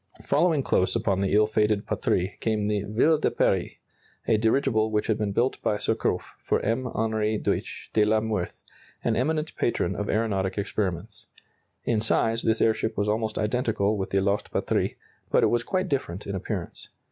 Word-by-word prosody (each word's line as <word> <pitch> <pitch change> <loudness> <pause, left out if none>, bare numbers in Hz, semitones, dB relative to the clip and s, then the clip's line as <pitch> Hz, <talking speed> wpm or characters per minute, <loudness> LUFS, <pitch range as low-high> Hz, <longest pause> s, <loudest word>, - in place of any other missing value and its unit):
] - - -19
Following 155 -2 +2
close 95 -3 +1
upon 105 -4 +1
the 100 - 0
ill 105 0 +6
fated 105 -1 +1
"Patrie" 95 +2 -1
came 110 -2 0
the 105 -1 0
"Ville 150 +9 +3
de - - +2
Paris," - - +1 0.5
a 110 - +4
dirigible 110 0 +2
which 105 -1 0
had 110 - +1
been 105 -2 0
built 120 +6 0
by 105 - +1
Surcouf 105 - -1
for - - 0
M. 115 +4 -1
Henri 110 -1 0
Deutsch - - -3
de 110 - +4
la 110 +1 +3
Meurthe, 110 -5 -3 0.4
an - - +1
eminent 155 +5 -1
patron 120 - 0
of 105 - -3
aeronautic 100 -4 0
experiments. 100 -2 -3 0.6
In 110 -3 +1
size 115 +1 +2
this 110 0 +1
airship 110 0 +1
was 100 +1 0
almost 110 0 -1
identical 110 -2 0
with 95 -2 -3
the 95 - +1
lost 100 +1 0
"Patrie," - - 0 0.3
but - - +3
it - - +4
was 120 - +2
quite 185 +5 -1
different 105 - -3
in 100 - -4
appearance. 95 - -5
110 Hz, 180 wpm, -26 LUFS, 105-115 Hz, 0.6 s, ill